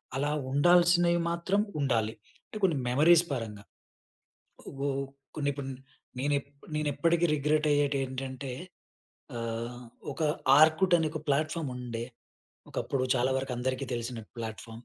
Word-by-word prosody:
అలా 145 +2 0 0.2
ఉండాల్సినవి, 175 +3 +5
మాత్రం 185 +4 +1 0.2
ఉండాలి. 115 -5 +1 0.3
అంటే, - - -8
కొన్ని 170 -6 +3
మెమరీస్ 165 +7 +5
పరంగా. 110 -5 -5 1.1
ఓవ్ 135 0 -5 0.5
కొన్నీ, 145 -2 0
ఇపన్ 135 -1 -5 0.5
నేను 145 +3 +1
ఎప్ 140 - -23 0.3
నేను 150 -1 0
ఎప్పటికి 170 +4 +2
రిగ్రెట్ 150 +1 +1
అయ్యేటెంటంటే, 135 -2 -1 0.9
ఆహ్, 115 +1 -4 0.3
ఒక - - -5 0.4
ఆర్కుట్ 160 +4 +5
అనే 160 - +1
ఒక 155 - -4
ప్లాట్ఫార్మ్ 155 +1 0
ఉండే, 120 -2 -4 0.7
ఒకప్పుడు. 135 -2 -1
చాలా 125 +1 +2
వరకు 135 -1 -4
అందరికి 130 +2 -2
తెలిసిన 120 0 -4 0.2
ప్లాట్ఫామ్ 115 +1 -7
140 Hz, 120 wpm, -29 LUFS, 125-160 Hz, 1.1 s, ఉండాల్సినవి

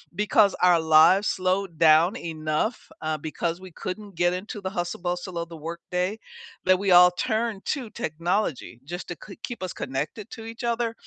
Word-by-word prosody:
because 210 0 +4
our 180 -1 +6
lives 160 +5 +5
slowed 185 -2 -1
down 165 +6 +5
enough, 155 +6 -2 0.2
uh, 155 0 -1
because 165 +3 -3
we 185 -2 -10
couldn't 195 +3 -7
get 175 +1 +2
into 205 +3 -5
the 190 - -3
hustle 175 -3 -3
bustle 175 0 -3
of 170 0 -3
the 165 - -9
workday, 180 +5 -3 0.5
that 185 0 +5
we 195 -1 +1
all 180 0 +9
turned 220 +2 -2
to 260 -7 -2
technology 165 - -2
just 175 +4 -6
to 175 - -5
k 195 - -12
keep 235 -6 -5
us 185 - -3
connected 150 - -4
to 225 - -8
each 230 +2 -8
other, 235 -1 0
180 Hz, 180 wpm, -25 LUFS, 165-210 Hz, 0.5 s, all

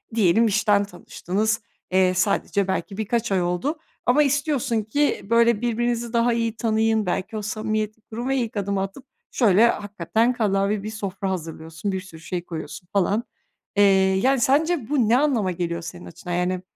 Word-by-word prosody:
diyelim 220 +2 +4
işten 205 -1 +3
tanıştınız. 205 +3 -2 0.3
Eee, 185 -1 +3
sadece 200 +1 +1
belki 195 +1 -3
birkaç 220 +1 -1
ay 185 -2 +2
oldu 180 - -1 0.3
ama 275 +5 +4
istiyorsun 280 -5 0
ki, 285 +8 0
böyle, 230 -1 +4
birbirinizi 240 0 -1
daha 235 0 +3
iyi 230 -1 -1
tanıyın. 220 -2 +1
Belki 195 +5 -2
o - - -3
samimiyeti 215 0 -3
kurup 235 +4 -6
ve 270 - +1
ilk 225 -4 -2
adımı 200 -1 -1
atıp 195 +8 -6 0.3
şöyle 225 -1 +5
hakikaten 210 +3 0
kallavi 200 -2 0
bir 215 - -4
sofra 195 -2 -4
hazırlıyorsun, 165 +2 -5
bir 190 -1 -3
sürü 165 -4 -13
şey 175 +1 -4
koyuyorsun 160 +1 -7
falan. 200 +4 +1 0.5
Eee, 205 - +5 0.3
yani, 265 +7 +2
sence 290 0 +2
bu 255 -7 +2
ne 240 - +5
anlama 245 -10 +1
geliyor 170 -1 -3
senin 170 +1 -8
açından? 175 +1 -7
Yani, 180 +1 0
215 Hz, 165 wpm, -23 LUFS, 185-235 Hz, 0.5 s, şöyle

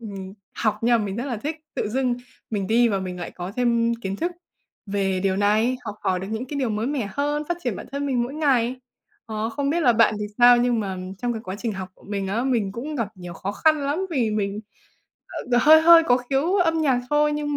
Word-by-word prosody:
ừm, 195 -4 -7 0.2
học, 215 -2 0
nhưng 235 0 +4
mà 215 - -1
mình 195 0 -4
rất 240 - -3
là 250 -4 -2
thích 300 +9 -4 0.2
tự - - -2
dưng 250 +2 0 0.4
mình 200 -3 -2
đi 235 +3 +4
và 200 -3 0
mình 180 -1 -5
lại 175 - -5
có 180 +2 -7
thêm 235 -1 +2
kiến 195 -4 -5
thức 345 - -2 0.5
về 195 -2 -1
điều 190 0 +1
này, 215 +5 +2
học 210 -2 -5
hỏi 185 -1 +1
được 190 - -6
những 225 +3 -3
cái 285 +2 -4
điều 255 -4 0
mới 215 +2 -1
mẻ 265 -7 -2
hơn, 290 +4 -1
phát 345 - 0
triển 240 -6 -1
bản - - -8
thân 280 +1 -2
mình 255 -3 +1
mỗi 250 +4 -4
ngày. 260 -5 +1 0.5
Ờ, 220 -1 -3
không 280 +4 -1
biết 340 +3 +1
là 250 -7 +5
bạn 225 -1 +4
thì - - -1
sao, 245 0 +8
nhưng 240 -1 +2
mà 195 -3 -3 0.2
trong 245 +2 -1
cái 225 -2 -6
quá 185 +1 -5
trình 230 -1 -2
học 190 -2 -6
của - - -22
mình 200 -1 -2
á 225 +6 -1
mình 230 -7 0
cũng 285 +8 -5
gặp 230 -5 -1
nhiều 175 -1 -8
khó 200 - -4
khăn 310 +7 +3
lắm 320 +7 -1
vì 250 -9 +1
mình, 205 -1 -2 0.9
ờ, 240 - +5
hơi 315 +3 +8
hơi 335 +1 +8
có 245 -5 +4
khiếu 270 +8 0
âm 325 -4 +2
nhạc 265 -5 +2
thôi, 295 0 +3
nhưng 295 -1 -2
235 Hz, 250 wpm, -23 LUFS, 205-280 Hz, 0.9 s, sao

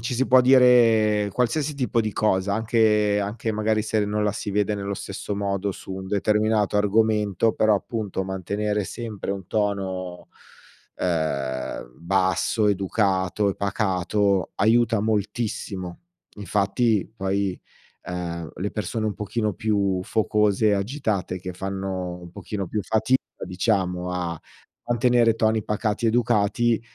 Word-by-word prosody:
ci 120 +2 -3
si 130 +2 +1
può 130 0 +6
dire 115 -5 +5
qualsiasi 140 +5 0
tipo 125 -3 0
di 110 -2 -2
cosa, 100 -1 +1
anche 105 -2 +2
anche 110 +2 -3
magari 110 0 +1
se 110 -1 0
non 105 +1 -1
la 105 - +1
si 105 - -4
vede 105 +1 +1
nello 100 0 -3
stesso 100 +1 -5
modo 100 -1 -1
su 95 - -9
un 95 0 -6
determinato 105 0 +1
argomento, 105 0 +2
però 110 -1 +3
appunto, 105 -2 -3
mantenere 100 +3 -2
sempre 110 -4 -5
un 95 -3 -7
tono, 95 -4 -2 0.7
ehm, 70 -8 -2
basso, 95 +4 +1
educato 100 0 +1
e - - -4
pacato, 100 0 0
aiuta 115 +1 +3
moltissimo. 105 -4 -2 0.4
Infatti 105 +2 0
poi, 95 -1 -1 0.4
ehm, 85 -3 -5
le 100 +3 -3
persone 110 +2 -2
un 105 - -2
pochino 105 +1 -2
più 100 -3 0
focose, 105 -1 +2
agitate 100 -4 -2
che 90 0 -6
fanno 95 -1 -4
un 85 -1 -11
pochino 100 0 -5
più 105 +3 -2
fatica 110 +6 +1 0.2
diciamo 90 -1 -1
a 85 -2 -3 0.5
mantenere 120 -1 +3
toni 110 -1 +1
pacati, 105 +1 -1
educati, 115 0 +2
105 Hz, 130 wpm, -24 LUFS, 95-110 Hz, 0.7 s, può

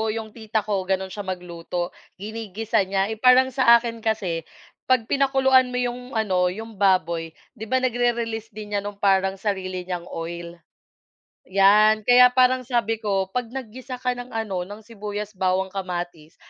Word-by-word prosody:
yung 220 -1 -6
tita 220 -1 -2
ko 200 -3 -1
ganun 190 0 -1
siya 205 - -5
magluto 175 -1 -4 0.3
ginigisa 215 0 -2
niya, 195 +1 0
eh, 220 - -3
parang 255 +1 +6
sa 235 -3 +7
akin 230 -1 -6
kasi 190 -7 -1 0.5
pag 255 -3 +3
pinakuluan 265 -2 +4
mo - - -2
yung 250 +1 -4
ano 185 -5 +2
yung 220 +2 -9
baboy, 170 -4 +2 0.3
'di 220 - -5
ba 260 - +2
nagre-release 235 -2 -1
din 210 -1 -7
niyan 200 0 -1
nung 205 -1 -7
parang 195 -1 +3
sarili 185 -3 -3
niyang 180 -2 -4
oil. 170 +1 -6 0.9
Yan 210 +3 +5
kaya 250 0 +8
parang 255 0 +4
sabi 230 -3 0
ko, 195 -2 0
'pag 250 -2 -2
naggisa 255 0 -7
ka 250 0 0
ng 245 0 -7
ano 215 -5 -2
ng 205 +2 -9
sibuyas 210 -1 -6
bawang 185 +1 0
kamatis 175 -4 -5
210 Hz, 160 wpm, -23 LUFS, 190-235 Hz, 0.9 s, kaya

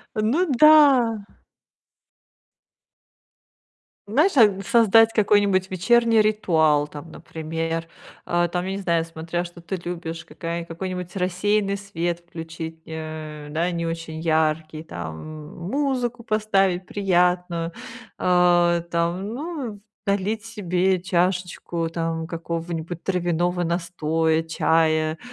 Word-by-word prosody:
Ну 235 +12 +2
да! 270 -8 +6 2.8
Знаешь, 300 - +2
а 230 -4 +8
н 195 -1 -1
создать 225 +1 +5
какой-нибудь 205 -3 +3
вечерний 225 +4 +3
ритуал, 160 -9 +2
там, 150 +2 -10
например. 165 +1 -4 0.4
Э, 175 0 +1
там, 180 0 -1
я 190 - -3
не 195 - -3
знаю, 170 -3 +1
смотря 165 +2 -4
что 175 0 -11
ты 190 +3 -4
любишь, 170 -2 -6
какая 170 0 -5
какой-нибудь 180 +2 -6
рассеянный 200 +2 0
свет 175 -3 -3
включить, 160 -1 -7
э, 155 -2 -7
да, 170 +3 0
не 170 -1 -2
очень 165 -1 -5
яркий, 155 -1 0
там, 80 - -7
м, 155 -1 -10
музыку 255 -4 -1
поставить 195 -5 +1
приятную, 180 -3 +1 0.5
а, 175 -1 +3
там, 170 +3 -1
ну, 260 - -5 0.3
налить 205 +2 0
себе 190 -4 0
чашечку, 180 -2 -1
там, 165 -1 -2
какого-нибудь 165 0 -5
травяного 175 -1 0
настоя, 165 -2 0
чая. 160 -1 +1
175 Hz, 110 wpm, -23 LUFS, 165-200 Hz, 2.8 s, а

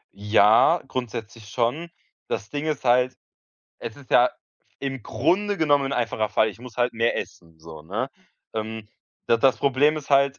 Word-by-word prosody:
Ja, 105 - +4
grundsätzlich 115 -4 -6
schon. 130 +10 -1 0.4
Das 105 - -4
Ding 145 +1 -3
ist 150 -4 -2
halt, 125 +1 +3 0.6
es 115 - -7
ist 140 -3 -16
ja 125 +1 +6 0.5
im 135 -3 -4
Grunde 185 - 0
genommen 145 -4 +2
'n 135 - -3
einfacher 115 -3 -1
Fall. 110 +1 +2
Ich 105 - -15
muss 125 -3 -11
halt 120 0 +1
mehr 115 +1 +1
essen, 80 -1 -8
so, 80 -1 -11
ne? 105 - -4 0.4
Ähm, 110 0 -5 0.4
da 115 - +4
das 130 +2 +4
Problem 145 +3 +2
ist 150 -2 -8
halt, 140 0 +3
125 Hz, 170 wpm, -24 LUFS, 110-140 Hz, 0.6 s, ja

